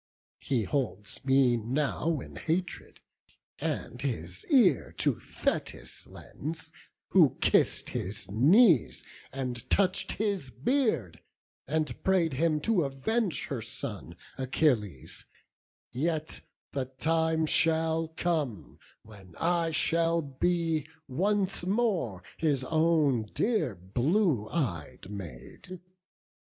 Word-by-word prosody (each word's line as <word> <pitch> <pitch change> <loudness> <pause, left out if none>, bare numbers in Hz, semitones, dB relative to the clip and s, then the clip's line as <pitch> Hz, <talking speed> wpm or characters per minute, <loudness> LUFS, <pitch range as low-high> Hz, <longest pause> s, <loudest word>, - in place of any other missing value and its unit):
He 125 -5 0
holds 105 -4 -3
me 130 -2 +4
now 145 +6 -1
in - - -11
hatred, 175 +3 -3 0.6
and - - -3
his - - -3
ear 210 - +4
To - - +1
Thetis - - -4
lends, 160 +3 -7 0.4
who - - +5
kiss'd - - +2
his 105 +5 -3
knees, 160 - +5 0.3
and 125 -3 -5
touch'd 190 -1 +2
His 200 -10 -2
beard, 215 - 0 0.5
and 150 -3 -2
pray'd 180 -5 +2
him 155 +2 +1
to 195 -1 +2
avenge 175 - -1
her 135 -5 -4
son 105 - -7 0.2
Achilles; 125 - 0 0.7
yet 155 +3 -2 0.3
the 135 -2 -2
time 160 +4 +1
shall 160 +1 +2
come 160 - -2 0.2
when 100 -5 -15
I 170 0 +1
Shall 165 +1 +2
be 160 +2 0 0.2
once 195 +6 0
more 185 - 0
his 145 -5 +1
own 155 -5 +2
dear 180 - +1
blue 120 - +1
ey'd 95 - -3
Maid. 100 - -9
155 Hz, 100 wpm, -29 LUFS, 120-170 Hz, 0.7 s, who